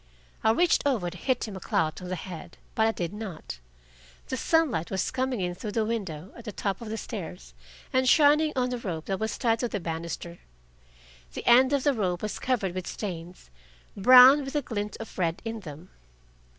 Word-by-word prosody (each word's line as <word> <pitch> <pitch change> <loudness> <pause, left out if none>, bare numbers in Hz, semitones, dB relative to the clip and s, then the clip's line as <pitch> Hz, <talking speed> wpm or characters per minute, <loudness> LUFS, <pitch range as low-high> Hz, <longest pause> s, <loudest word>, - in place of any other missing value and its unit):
I - - +4
reached 340 +10 +3
over 210 -11 0
to - - -11
hit 250 +6 -1
him 205 - -7
a - - -6
clout 160 -2 -1
on 180 - -7
the 185 - -2
head, 170 -2 -9 0.2
but 220 0 +3
I - - +3
did 175 -3 -4
not. 190 - -7 0.7
The - - -1
sunlight 260 - +1
was 190 - -1
coming 255 -4 -1
in 180 -1 -1
through 205 +3 -6
the 225 -2 +1
window 195 -7 -4
at 235 - -12
the 215 - -4
top 195 0 -3
of 230 - -7
the 220 - -3
stairs, 160 - -7 0.4
and 260 0 +3
shining 305 +1 +5
on 250 -1 0
the 245 - -3
rope 165 -8 -5
that 195 -1 -2
was 220 0 -2
tied 230 -3 +1
to 245 - 0
the 210 - -3
banister. 170 0 -5 1.0
The - - -6
end 255 +3 +6
of 280 -2 +1
the 285 - +3
rope 185 -6 -1
was 215 - -3
covered 215 -8 0
with 185 -1 -5
stains, 175 - -7 0.4
brown, 255 +7 +8
with 270 +2 -7
a 295 - +1
glint 210 -4 -4
of 225 -3 -9
red 170 -2 0
in 225 0 -4
them. 165 -2 -11
210 Hz, 205 wpm, -27 LUFS, 175-250 Hz, 1.0 s, brown